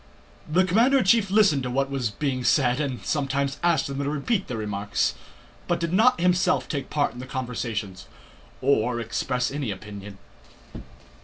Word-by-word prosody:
The 180 +5 +3
commander 230 +9 +4
in 260 - +3
chief 200 +1 +3
listened 195 -8 +4
to 125 - -3
what 135 +2 -1
was 130 -5 -1
being 130 +3 -2
said 125 -1 +3
and 130 -8 -3
sometimes 140 -1 -1
asked 170 -1 +2
them 140 0 -4
to 140 0 -1
repeat 185 +8 -1
their 120 - -4
remarks, 100 - -1 0.5
but 175 - 0
did 170 0 -2
not 225 +2 +4
himself 180 +1 +2
take 140 -4 -4
part 145 -1 0
in 125 - -10
the 130 - -7
conversations 115 -8 -4 0.6
or 125 -3 +2
express 125 +2 -2
any 140 -4 -3
opinion. 100 0 -8
135 Hz, 165 wpm, -25 LUFS, 120-170 Hz, 0.6 s, commander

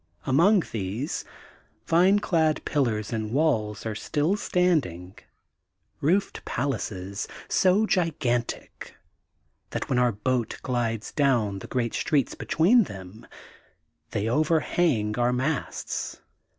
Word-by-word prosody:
Among 175 +9 +4
these, 110 - -3 0.6
vineclad 170 -3 +3
pillars 115 -7 0
and 110 -1 -2
walls 115 -8 0
are 110 - -2
still 150 - 0
standing, 150 - 0 0.8
roofed 185 +7 0
palaces, 100 -7 -3 0.2
s<^ 195 +3 +3
gigantic 140 - -1 0.7
that, - - -4
when 125 - +2
our 125 -1 +3
boat 115 +2 -1
glides 115 -3 -2
down 120 -9 +1
the - - -9
great 120 -3 -1
streets 140 -5 +1
between 205 +8 +3
them, 95 - -10 0.8
they 105 +2 -2
overhang 150 -5 +1
our 120 0 +3
masts. 130 +4 -3
130 Hz, 100 wpm, -26 LUFS, 110-160 Hz, 0.8 s, Among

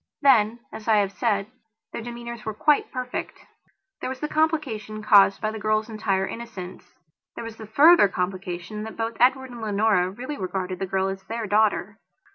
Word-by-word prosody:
Then, 235 -4 +4
as 220 - -9
I 220 - +5
have 200 -2 +2
said, 200 -1 0 0.5
their - - -4
demeanours 235 -1 -7
were 220 -1 -4
quite 295 +7 +2
perfect. 255 -1 -5 0.5
There - - -4
was 260 0 -5
the 300 - -2
complication 275 -10 -1
caused 200 -2 +6
by 215 - -1
the 220 - -6
girl's 215 +1 0
entire 200 -3 0
innocence; 190 -5 -8 0.4
there - - -6
was 230 -1 -8
the 220 - -9
further 290 +1 +7
complication 185 +2 -4
that 220 +1 -7
both 225 0 -2
Edward 260 +1 +3
and 240 -1 -9
Leonora 205 -3 +2
really 255 +9 -6
regarded 185 -2 -3
the 195 - -2
girl 190 +1 0
as 195 0 -4
their 230 0 -4
daughter. 210 0 +1
215 Hz, 180 wpm, -24 LUFS, 195-235 Hz, 0.5 s, further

